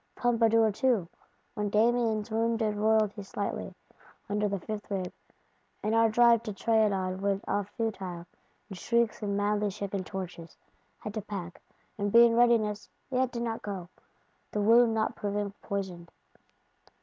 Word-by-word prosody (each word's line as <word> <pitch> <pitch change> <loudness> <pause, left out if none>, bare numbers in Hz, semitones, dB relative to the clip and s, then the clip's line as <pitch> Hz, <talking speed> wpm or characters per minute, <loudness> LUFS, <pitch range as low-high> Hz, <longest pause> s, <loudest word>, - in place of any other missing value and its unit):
Pompadour 230 -2 +3
too, 225 -5 +1 0.5
when 210 -1 -2
Damiens 225 0 +1
wounded 225 -1 0
Royalty 215 -1 +2
"slightly, 200 +1 -4 0.5
under 210 0 0
the 200 - -1
fifth 210 +3 -6
rib," 190 -3 -3 0.7
and 215 - 0
our 225 0 +4
drive 235 0 +5
to 220 -3 -5
Trianon 195 -3 +1
went 200 0 -1
off 205 -1 -1
futile, 190 -7 -3 0.4
in 200 - -8
shrieks 235 +4 0
and 200 -1 -1
madly 205 0 +1
shaken 200 -1 -4
torches,—had 185 +2 -9
to 215 - -3
pack, 190 -4 -7 0.4
and 205 0 0
be 235 +2 +8
in 230 - +3
readiness: 230 -3 +2 0.2
yet 255 -1 +1
did 235 -1 -3
not 225 -1 -3
go, 190 -4 -6 0.6
the 210 - -2
wound 225 +2 +5
not 220 0 0
proving 205 0 -3
poisoned. 185 -4 -5
210 Hz, 140 wpm, -29 LUFS, 200-225 Hz, 0.7 s, be